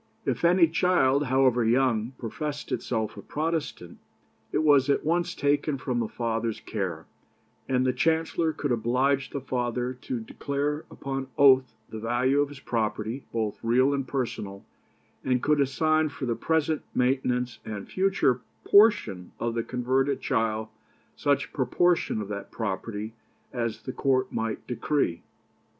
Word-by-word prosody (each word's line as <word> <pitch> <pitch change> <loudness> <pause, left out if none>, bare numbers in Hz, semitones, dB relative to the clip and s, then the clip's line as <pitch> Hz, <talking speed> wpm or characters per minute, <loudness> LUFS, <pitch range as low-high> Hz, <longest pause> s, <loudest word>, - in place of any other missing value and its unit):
If - - -1
any 170 0 +6
child, 150 -5 +2
however 130 -2 +3
young, 120 0 +2
professed 145 +5 -5
itself 110 -3 -2
a - - -7
Protestant, 150 - -3 0.5
it - - +1
was 145 -2 +5
at 140 - +2
once 175 +2 0
taken 145 0 +1
from 125 -2 -2
the 115 - 0
father's 115 -1 -2
care, 95 -5 -4 0.6
and 130 -1 +2
the 130 - +2
Chancellor 160 +3 +1
could 145 -3 -3
oblige 130 +4 +1
the 140 - -4
father 125 -1 -2
to 125 -1 -5
declare 145 +6 -3
upon 135 -1 -4
oath 130 -4 +5
the 110 - -6
value 125 +5 +2
of 145 - 0
his 145 -2 -10
property, 110 +1 -2
both 110 -3 -2
real 130 +4 +3
and 135 -2 -2
personal, 105 -7 -4 0.6
and 125 -1 +1
could 150 -1 +3
assign 155 +3 +2
for 140 -1 -5
the 120 - 0
present 160 +1 0
maintenance 125 -1 0
and 105 -2 -6
future 185 -10 +1 0.2
portion 200 - +4
of 120 0 -1
the 115 - 0
converted 130 +3 0
child 110 -4 -1 0.5
such 145 -1 0
proportion 160 +1 +1
of - - -8
that 100 -1 -6
property 105 0 -4 0.4
as 115 -3 -3
the 130 - -5
court 130 -1 +1
might 110 -1 -3
decree. 125 - -1
130 Hz, 145 wpm, -27 LUFS, 115-145 Hz, 0.6 s, any